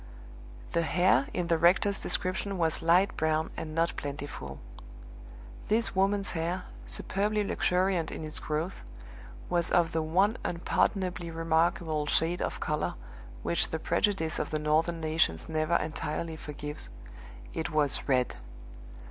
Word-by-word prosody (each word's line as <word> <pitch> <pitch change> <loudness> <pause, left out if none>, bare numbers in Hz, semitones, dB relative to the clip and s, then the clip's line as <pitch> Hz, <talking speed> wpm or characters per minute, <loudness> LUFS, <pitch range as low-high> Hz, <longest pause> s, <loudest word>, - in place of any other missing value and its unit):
The 170 - +2
hair 175 -5 +3
in 180 - -1
the 165 -1 +2
rector's 190 +4 +4
description 190 +2 -1
was 165 -2 +1
light 180 +4 +4
brown 155 0 +1
and 155 -1 -5
not 165 +1 +1
plentiful. 140 - -6 1.1
This 225 -1 +1
woman's 195 +1 +2
hair, 175 +2 -2 0.2
superbly 210 +2 0
luxuriant 180 -3 +1
in - - -5
its 155 - -4
growth, 155 +4 -3 0.6
was 170 -1 +1
of 170 -2 +3
the 160 - 0
one 190 +9 +2
unpardonably 180 0 0
remarkable 165 -1 +1
shade 165 +4 +2
of - - -2
color - - -1 0.5
which 170 - +1
the 160 - -2
prejudice 165 -1 +1
of - - -2
the 155 - -1
Northern 155 +3 +1
nations 155 - +1
never 160 +1 +1
entirely 160 +1 -2
forgives 150 - -7 0.6
it 160 - -2
was 150 -3 +1
red! 125 -2 +2
165 Hz, 130 wpm, -29 LUFS, 155-180 Hz, 1.1 s, rector's